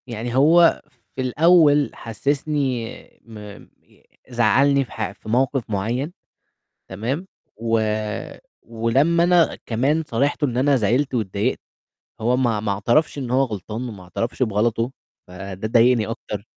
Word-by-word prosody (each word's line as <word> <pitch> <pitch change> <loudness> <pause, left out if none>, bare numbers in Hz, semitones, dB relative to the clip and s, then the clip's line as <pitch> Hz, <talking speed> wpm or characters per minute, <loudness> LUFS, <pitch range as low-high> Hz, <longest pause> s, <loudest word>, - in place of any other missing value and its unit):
يعني 120 0 -5
هو 165 +5 +5 0.3
في 130 - -3
الأول 150 +2 +4
حسِّسني 135 +1 -2 0.4
م 115 -2 -12 0.5
ي - - -28 0.3
زعّلني 130 +4 +3
في - - -20
ح - - -4
في - - -13
موقِف 130 +1 0
معيّن 120 - -2 0.8
تمام؟ 125 - -4 0.3
و 115 0 0 0.8
ولمّا 130 +9 +1
أنا 175 -2 +3
كمان 135 +8 0
صارحته 140 +4 0
إن 125 -3 -3
أنا 140 +2 +3
زعلت 125 +5 +1
واتضايقت 110 +1 -1 0.6
هو 120 +3 +2
ما 120 -5 +1
ما 105 -1 -2
اعترفش 120 +11 +1
إن 130 -4 -4
هو 130 +2 +3
غلطان، 110 +1 -5
وما 100 -5 -10
اعترفش 115 +8 -3
بغلطه، 115 +2 0 0.4
فده 95 +2 -6
ضايقني 115 0 +3
أكتر. 105 -3 -6
120 Hz, 130 wpm, -21 LUFS, 110-140 Hz, 0.8 s, هو